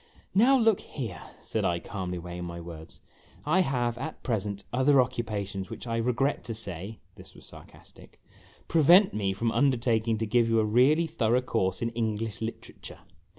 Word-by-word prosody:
" - - -34
Now, 245 +7 +5
look 225 -5 +3
here," 110 -11 -7 0.2
said - - -2
I, 85 - +1
calmly 90 0 -5
weighing 90 0 -6
my 85 0 -6
words, 85 -1 -10 0.2
" - - -26
I - - +5
have, 120 -8 0
at 155 +4 -6
present, 100 -4 -2
other 130 +2 +4
occupations 105 -6 -2
which, - - -8
I 115 -1 -2
regret 125 +4 0
to 115 -2 -4
say," 100 0 -5 0.2
this - - -13
was - - -15
sar - - -13
castic, - - -18 0.3
" - - -28
prevent 170 +5 +5
me 100 -2 -1
from 115 +4 -1
undertaking 115 -4 +1
to 110 - -2
give 115 +1 +2
you 115 0 +3
a 110 - +2
really 130 +10 +4
thorough 125 -6 +1
course 110 -4 -1
in 115 - 0
English 110 -2 -3
literature. 115 +1 -8
115 Hz, 185 wpm, -28 LUFS, 100-130 Hz, 0.3 s, Now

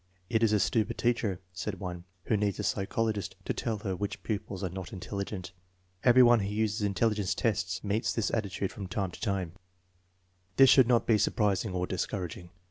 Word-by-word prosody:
a - - -3
It - - -2
is 115 -2 +4
a 105 - +3
stupid 110 0 +1
teacher," 115 -6 0
said 95 +2 -4
one, 90 -2 -6
" 90 - -41
who 110 - +2
needs 105 -1 0
a - - -3
psychologist 100 -1 -1
to - - -1
tell 115 -3 -2
her 95 -2 -3
which 100 +2 -4
pupils 105 -2 -4
are 95 - -1
not 95 -1 -6
intelligent/' 95 -1 -5 0.5
Every 125 0 +7
one 120 -1 +6
who 100 -1 -2
uses 110 +1 0
in 100 -1 0
telligence 105 -3 +1
tests 95 -5 -1
meets 105 +2 0
this 115 - -1
attitude 100 -3 -2
from 100 -2 -7
timo 95 -1 -2
to - - -12
time* 95 -6 -1 1.0
This 135 -1 +7
should 130 -4 +7
not 120 -2 +3
be 110 -2 +3
surprising 105 -1 +1
or 90 0 0
discouraging. 90 -2 -4
100 Hz, 200 wpm, -30 LUFS, 95-110 Hz, 1.0 s, Every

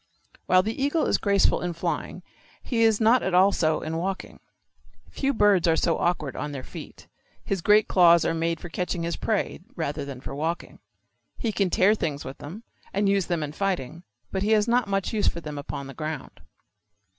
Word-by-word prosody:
While 185 0 +5
the 225 +6 -3
eagle 290 +3 +1
is - - +1
graceful 200 -1 +2
in 175 -1 -2
flying 165 - -4 0.4
he 235 -3 -1
is 225 -2 +4
not 230 +3 +4
at 190 - -1
all 190 +2 +6
so 155 -4 +1
in 160 +1 -3
walking. 190 +3 -4 0.7
Few 275 0 0
birds 205 -8 +3
are 165 - +4
so 165 0 +1
awkward 155 -6 -1
on 145 0 -4
their 135 -2 -6
feet. - - -11 0.4
His 195 -3 -1
great 210 +3 +4
claws 170 -2 +5
are 165 - +1
made 165 0 -1
for - - -8
catching 175 0 -3
his 170 0 -2
prey 215 -3 -1 0.2
rather 145 - -3
than 140 -2 -7
for 135 - -7
walking. 160 +4 -4 0.6
He 230 - -1
can 200 -2 0
tear 190 +4 +4
things 155 -9 -3
with 135 +1 -8
them 185 +10 -9 0.3
and 200 +1 +1
use 195 -2 +2
them 170 -3 -1
in 145 - -4
fighting, 170 -4 -2 0.3
but 190 - -2
he 210 +2 +2
has 210 0 +3
not 240 0 +2
much 195 0 -1
use 210 -2 +1
for 170 - 0
them 150 -3 -6
upon 140 0 -6
the 135 - -9
ground. 155 +2 -6
180 Hz, 205 wpm, -25 LUFS, 160-205 Hz, 0.7 s, all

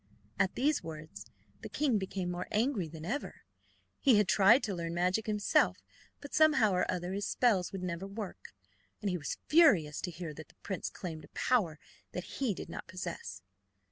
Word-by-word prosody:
At 195 -2 +2
these 290 +4 +2
words 155 -10 -9 0.3
the - - -7
king 270 -7 +1
became 190 -2 -3
more 180 +1 -4
angry 215 - +1
than 160 0 -9
ever. 260 +11 -4 0.6
He 265 -5 +5
had 210 -2 +3
tried 200 +9 +6
to 205 - -1
learn 170 -1 -4
magic 180 +5 +1
himself, 210 -1 +2 0.4
but 285 - -10
somehow 295 -9 +5
or 180 -1 +1
other 180 0 -2
his 200 +1 -2
spells 210 -8 +2
would 190 -2 -5
never 180 +1 -3
work, 195 - -8 0.4
and 200 - -1
he 180 - 0
was 140 - -4
furious 205 - +5
to - - -3
hear 170 -2 -6
that 155 +1 -10
the - - -23
prince 190 - -3
claimed 160 -5 -7
a - - -25
power 190 -12 +1 0.4
that - - -6
he 250 -8 +1
did - - -7
not - - -7
possess. 180 - -6
190 Hz, 185 wpm, -32 LUFS, 170-220 Hz, 0.6 s, tried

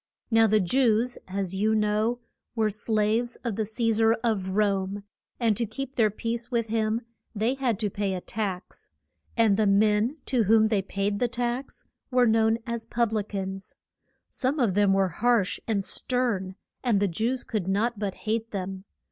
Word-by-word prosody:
Now 225 0 +5
the 215 0 +4
Jews, 235 +3 +2
as 190 -1 -2
you 215 +3 +1
know, 215 +3 +1 0.3
were 220 -2 +1
slaves 215 +3 0
of 235 -5 -2
the 220 0 -1
Ce 225 0 0
sar 225 0 +5
of 215 -5 0
Rome, 200 -1 0 0.4
and 230 -3 +2
to 235 +2 -1
keep 270 +5 -6
their 220 -3 +4
peace 230 +3 -4
with 230 -3 -1
him 220 +1 0 0.3
they 220 +5 +1
had 260 -5 0
to 210 - +1
pay 200 -1 -1
a 180 - -4
tax. 195 -3 -5 0.5
And 220 -4 +4
the 215 -1 +3
men 210 +6 +3
to 240 -5 +1
whom 220 +1 +5
they 210 -3 +2
paid 200 +1 -2
the 245 - +2
tax 245 +2 -3 0.2
were 250 -1 +4
known 225 0 +3
as 235 -2 -4
pub 235 -1 0
li 215 - +1
cans. 195 -1 -5 0.5
Some 270 +3 -1
of 230 -7 +2
them 205 0 +3
were 195 -1 +3
harsh 230 +2 +1
and 200 -4 0
stern, 225 -7 -1 0.3
and 235 -6 +2
the 200 - +2
Jews 230 +8 -1
could 210 -6 -3
not 210 +3 0
but 200 -3 -2
hate 225 +1 -1
them. 190 -1 -5
220 Hz, 180 wpm, -26 LUFS, 200-235 Hz, 0.5 s, Now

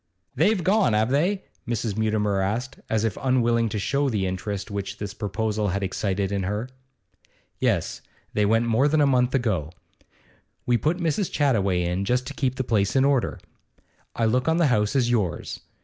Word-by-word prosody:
'They've 180 - +2
gone, 195 - +3
have 110 +3 +2
they?' 180 +8 +1 0.2
Mrs. 115 -3 -2
Mutimer 105 -2 +1
asked, 110 +7 -2
as 110 -1 +1
if 110 -3 -1
unwilling 120 -3 +2
to 105 - -3
show 140 +7 0
the 105 -5 -1
interest 95 +2 -4
which 100 -1 -4
this 100 -1 -5
proposal 105 0 -2
had 100 +1 -1
excited 95 0 -1
in 100 -1 -1
her. 105 +5 -2 0.9
'Yes, - - 0 0.3
they 105 - +2
went 115 +3 +3
more 115 +5 +3
than 155 +1 +2
a - - +5
month 125 -1 +2
ago. 100 - 0 0.9
We 120 - +3
put 155 +8 +1
Mrs. 170 +2 -1
Chattaway 100 -11 +2
in 90 +3 -1
just 125 +5 0
to - - -6
keep 130 -2 -1
the 130 - -1
place 105 -3 +1
in 135 0 +4
order. 140 -3 +1 0.8
I 115 - +1
look 125 +5 +1
on 160 +1 +3
the 170 - +3
house 105 +4 +1
as 120 -3 +2
yours. 105 -8 -1
115 Hz, 180 wpm, -24 LUFS, 100-130 Hz, 0.9 s, a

